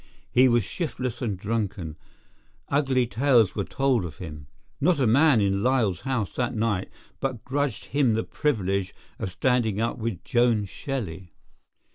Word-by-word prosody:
He 130 +1 +6
was 120 -2 +3
shiftless 130 - -4
and 105 -6 -1
drunken; 100 -5 -3 0.7
ugly 135 -3 +2
tales 115 -2 +3
were 100 - -1
told 130 -1 +1
of 85 -4 -7
him. 75 -5 -8 0.3
Not 165 +1 +3
a 130 - +3
man 130 +1 +5
in 100 0 +1
Lyall's 115 -7 +2
house 130 -7 -2
that 125 -1 -1
night 110 -4 0 0.3
but 130 -5 -3
grudged 140 -3 -1
him 130 -6 +2
the 115 - 0
privilege 100 -9 -1 0.2
of - - -2
standing 110 +2 +1
up 115 +1 -1
with 110 -6 -3
Joan 120 -4 +2
Shelley. 95 - -5
115 Hz, 150 wpm, -26 LUFS, 100-130 Hz, 0.7 s, He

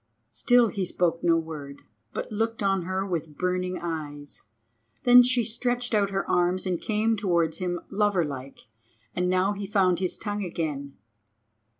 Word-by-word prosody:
Still 230 - +4
he 195 -1 -2
spoke 175 -2 0
no 170 -1 +4
word, 150 -4 -6 0.3
but - - -5
looked 225 +1 -1
on 195 -3 +1
her 190 +1 -1
with 165 -5 -4
burning 180 0 -1
eyes. 150 -4 -5 0.6
Then 245 0 +9
she 245 -1 +2
stretched 245 +2 -1
out 205 -2 +3
her 195 0 -2
arms 180 +2 +1
and 180 -3 -1
came 220 +1 +1
towards 170 -6 0
him 175 -1 -2
lover 200 -4 +2
like. 135 -2 -7 0.5
And 180 0 0
now 185 +2 +2
he 200 0 -5
found 190 -3 +2
his 185 -2 -1
tongue 205 -1 -3
again. 150 -6 -4
185 Hz, 160 wpm, -26 LUFS, 165-205 Hz, 0.6 s, Then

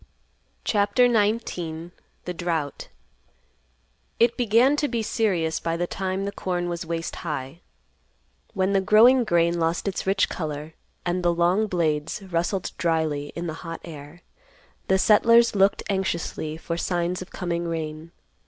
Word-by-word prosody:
CHAPTER 205 +4 +3
XIX. 205 -7 -1 0.3
THE 180 - -3
DROUGHT. 165 -4 -3 1.3
It 235 0 +4
began 245 +4 +4
to 295 - +1
be 235 -3 -2
serious 180 -8 0
by 165 0 -2
the 175 - 0
time 190 +2 -3
corn 175 -3 -2
was 170 0 -3
waist 165 0 -3
high. 150 0 -5 0.9
When 190 0 +1
the 195 - +3
growing 235 +6 +6
grain 170 -4 +2
lost 165 +4 0
its 190 -1 -3
rich 195 0 +3
color 155 -1 -5 0.3
and 180 +1 0
the 175 -1 +3
long 175 +5 +2
blades 160 -1 -1
rustled 185 +1 -2
dryly 160 -4 0
in 170 - -4
the 160 - -3
hot 165 -1 -6
air, 155 +1 -11 0.6
the 190 - +4
settlers 230 +4 +5
looked 195 0 +3
anxiously 170 -5 -2
for 170 +1 -4
signs 175 +1 -1
of 185 - -8
coming 170 -2 -3
rain. 160 0 -5
175 Hz, 140 wpm, -24 LUFS, 165-200 Hz, 1.3 s, growing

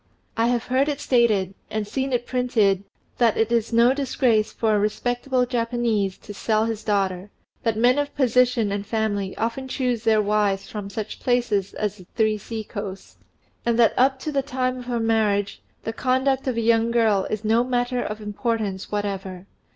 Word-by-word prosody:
I 230 0 +2
have 240 -1 +1
heard 265 +3 +1
it 290 -1 -2
stated, 225 -9 +2 0.2
and 215 -1 -3
seen 265 +5 -2
it 240 -1 0
printed, 220 -7 +1 0.3
that 235 -3 +3
it 225 +1 +1
is 230 -1 +1
no 235 +2 +5
disgrace 255 -5 +1
for 220 -2 +1
a - - +2
respectable 245 +4 0
Japanese 230 -5 -1
to 205 - -7
sell 215 +1 +1
his 225 -2 -3
daughter, 195 -2 -1 0.3
that 225 -2 0
men 245 +5 +4
of 290 0 -3
position 250 -4 +2
and 200 0 -2
family 205 -3 -2
often 235 +4 -2
choose 250 -3 -1
their 220 -1 +4
wives 205 -2 +1
from 205 -2 -6
such 215 +1 -5
places 235 -6 0
as 210 -1 -2
"The 185 -3 -15
Three 215 -2 +2
Sea 220 +1 -5
coasts," 200 -2 -8 0.4
and 235 -1 +1
that 235 -1 +5
up 265 +1 +3
to 305 - -3
the 280 -2 +1
time 255 -2 -2
of 250 - -9
her 240 -1 -1
marriage 215 -3 +1 0.2
the 225 - -3
conduct 260 +2 +1
of 250 -3 -1
a - - +1
young 230 0 +3
girl 220 -5 +2
is 215 0 -3
a 225 +2 +3
matter 245 0 0
of 210 -2 -4
no - - -9
importance 210 -2 -2
whatever. 195 -3 -3
225 Hz, 190 wpm, -23 LUFS, 210-245 Hz, 0.4 s, no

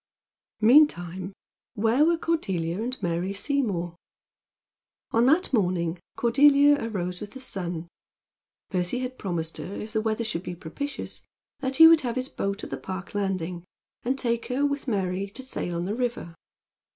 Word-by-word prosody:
Meantime 190 - +4 0.4
where 225 +6 +3
were 335 +1 +3
Cordelia 190 - -1
and 250 +3 -3
Mary 175 +3 -1
Seymour? 200 - -1 1.2
On 230 +2 +4
that 320 +3 +3
morning 180 -5 +1 0.2
Cordelia 285 +3 +5
arose 180 -5 -3
with 205 - -7
the 265 - -8
sun. 175 -9 -4 0.8
Percy 180 +4 0
had 255 0 -5
promised 165 -4 -3
her, 195 - -6
if 215 +1 -7
the 220 - +1
weather 220 +1 -1
should 215 -7 -2
be 180 - -6
propitious, 190 - -6 0.4
that 265 -1 -2
he 325 - +9
would 325 -1 +7
have 245 -3 -2
his 255 +1 -2
boat 200 +1 -3
at - - -7
the - - -2
Park 190 0 -7
landing, 185 -4 -2 0.4
and 260 +3 -1
take 235 -3 -1
her, 265 +3 +1
with 285 -1 -2
Mary, 195 -3 -1
to 255 +7 -7
sail 175 -9 -3
on 170 +1 -2
the 200 - -2
river. 240 -8 -3
215 Hz, 160 wpm, -26 LUFS, 180-260 Hz, 1.2 s, he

